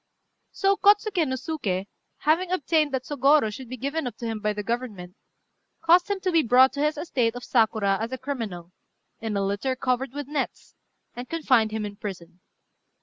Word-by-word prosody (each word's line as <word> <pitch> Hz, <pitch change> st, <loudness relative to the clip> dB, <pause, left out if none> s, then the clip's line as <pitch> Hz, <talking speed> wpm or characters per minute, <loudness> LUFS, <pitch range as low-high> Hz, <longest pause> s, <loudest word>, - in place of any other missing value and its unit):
So 395 Hz, 0 st, +1 dB
Kôtsuké 405 Hz, -5 st, +3 dB
no 260 Hz, -, -1 dB
Suké, 245 Hz, -, -3 dB, 0.4 s
having 330 Hz, +5 st, +2 dB
obtained 315 Hz, -4 st, +1 dB
that 265 Hz, -1 st, -2 dB
Sôgorô 280 Hz, -5 st, +3 dB
should 255 Hz, +1 st, -9 dB
be 255 Hz, -, -6 dB
given 280 Hz, +3 st, -2 dB
up 245 Hz, -, -7 dB
to 235 Hz, -, -6 dB
him 225 Hz, -1 st, -3 dB
by 210 Hz, 0 st, 0 dB
the 210 Hz, 0 st, -4 dB
Government, 210 Hz, -6 st, -4 dB, 0.7 s
caused 350 Hz, +3 st, +5 dB
him 400 Hz, -1 st, -1 dB
to 370 Hz, -, 0 dB
be 330 Hz, -2 st, +4 dB
brought 255 Hz, +1 st, +5 dB
to 280 Hz, -, -6 dB
his 300 Hz, +1 st, +1 dB
estate 250 Hz, -7 st, 0 dB
of 245 Hz, -, -7 dB
Sakura 220 Hz, -4 st, +2 dB
as 230 Hz, +2 st, -3 dB
a 260 Hz, -, -3 dB
criminal, 220 Hz, -11 st, -5 dB, 0.5 s
in 220 Hz, -2 st, -3 dB
a 195 Hz, -, 0 dB
litter 205 Hz, +7 st, -1 dB
covered 255 Hz, 0 st, -1 dB
with 290 Hz, 0 st, -5 dB
nets, 290 Hz, -2 st, -4 dB, 0.4 s
and 245 Hz, +1 st, -7 dB
confined 255 Hz, -9 st, +2 dB
him 215 Hz, 0 st, -3 dB
in 205 Hz, -1 st, -7 dB
prison. 180 Hz, -5 st, -8 dB
255 Hz, 190 wpm, -25 LUFS, 215-300 Hz, 0.7 s, caused